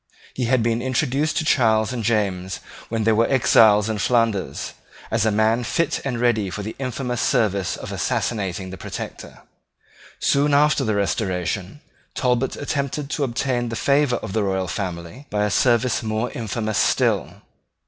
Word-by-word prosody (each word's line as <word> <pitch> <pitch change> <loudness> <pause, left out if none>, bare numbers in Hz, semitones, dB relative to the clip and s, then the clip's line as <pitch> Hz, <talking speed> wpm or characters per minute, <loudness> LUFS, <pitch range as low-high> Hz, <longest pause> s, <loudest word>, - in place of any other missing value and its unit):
He 125 - -2
had 120 -1 +2
been 115 0 0
introduced 130 +4 0
to 155 - 0
Charles 110 -4 +3
and 120 -2 -3
James 95 -4 -1 0.3
when 115 -1 -1
they 110 - +3
were 115 +1 +3
exiles 110 -5 +5
in 110 -2 -2
Flanders, 115 -3 0 0.4
as 110 0 +2
a - - +3
man 110 +3 +2
fit 165 +6 0
and 125 -4 -2
ready 115 -5 +1
for 90 +4 -5
the 110 - -6
infamous 125 -2 -3
service 100 -4 +1
of - - -7
assassinating 95 -4 -2
the 95 - -9
Protector. - - -8 0.8
Soon 140 +1 +2
after 150 +1 +3
the 110 -1 0
Restoration, 95 - -2 0.3
Talbot 125 0 0
attempted 140 0 -3
to 145 - -1
obtain 120 -1 -1
the 115 - -4
favour 140 0 +2
of 95 - -5
the 110 - +1
royal 95 -2 -1
family 90 - -5
by 105 0 0
a 105 - -1
service 120 +2 +2
more 110 +1 -2
infamous 110 -2 -2
still. - - +1
115 Hz, 160 wpm, -22 LUFS, 105-125 Hz, 0.8 s, exiles